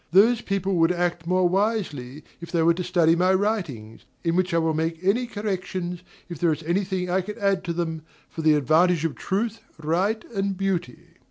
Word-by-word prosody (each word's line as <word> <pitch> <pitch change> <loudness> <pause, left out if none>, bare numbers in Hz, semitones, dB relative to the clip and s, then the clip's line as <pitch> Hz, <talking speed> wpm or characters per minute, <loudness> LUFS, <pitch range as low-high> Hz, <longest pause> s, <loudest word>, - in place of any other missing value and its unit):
DOMINIE. 195 +6 +7
Those 245 -2 -1
people 195 -1 -1
would 165 +1 +4
act 175 -1 -1
more 185 0 +3
wisely, 175 - -1 0.2
if 170 - -9
they 170 -2 +2
were 170 +1 +5
to 180 +2 -4
study 170 -2 +3
my 185 +2 +3
writings; 170 - -2 0.2
in 165 0 +1
which 185 0 +1
I 165 - +2
will 160 -1 +1
make 160 +1 -1
any 230 +6 +2
corrections, 185 -5 -4 0.3
if 170 -4 -8
there 170 -2 +3
is 155 +1 -3
any 175 +5 +1
thing 185 -1 -2
that 180 - -3
I 190 - +3
can 210 +4 -7
add 195 -3 +1
to 170 - -2
them, 165 -2 -3 0.3
for 160 - -7
the 155 -1 +4
advantage 160 +3 +3
of 165 - -1
truth, 220 +3 -2 0.2
right, 180 +8 0
and 195 -2 -1
beauty. 185 -10 -3
180 Hz, 210 wpm, -24 LUFS, 165-195 Hz, 0.3 s, DOMINIE